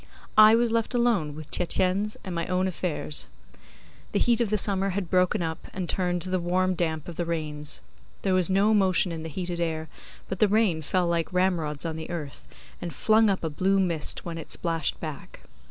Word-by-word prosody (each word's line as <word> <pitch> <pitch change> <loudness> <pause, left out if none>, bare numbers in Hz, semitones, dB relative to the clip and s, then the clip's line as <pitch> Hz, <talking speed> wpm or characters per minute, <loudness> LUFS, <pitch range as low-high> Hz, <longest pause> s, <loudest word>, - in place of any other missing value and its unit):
I 215 +1 +9
was 235 0 +2
left 230 +2 0
alone 215 -12 +1
with 155 -1 -10
Tietjens 185 +4 0
and 185 - -5
my 170 0 -2
own 185 +1 +1
affairs. 170 -4 0 0.9
The - - +2
heat 240 -1 +3
of 230 - +1
the 215 - +1
summer 195 -1 +1
had 185 -2 -3
broken 180 -1 +2
up 160 0 -5
and 185 -2 -3
turned 180 0 -1
to 185 - -5
the 185 - +1
warm 185 +2 +1
damp 160 -3 -2
of 170 - -8
the 175 - 0
rains. 150 -3 -4 0.4
There 190 - +1
was 185 -1 +3
no 200 +3 +3
motion 190 -3 +3
in 165 -1 -5
the 160 - -6
heated 175 +1 -4
air, 160 -2 -2 0.4
but 190 - -5
the 215 - +5
rain 200 -6 +2
fell 180 +4 0
like 170 0 -1
ramrods 175 -5 0
on 160 -1 -3
the 160 - -7
earth, 155 -5 -6 0.3
and 175 - -4
flung 215 +8 +3
up 195 -3 -1
a 160 - -1
blue 190 +6 +2
mist 170 -5 0
when 165 -1 -5
it 160 - -9
splashed 165 -4 -1
back. 155 -3 -8
180 Hz, 205 wpm, -26 LUFS, 160-195 Hz, 0.9 s, I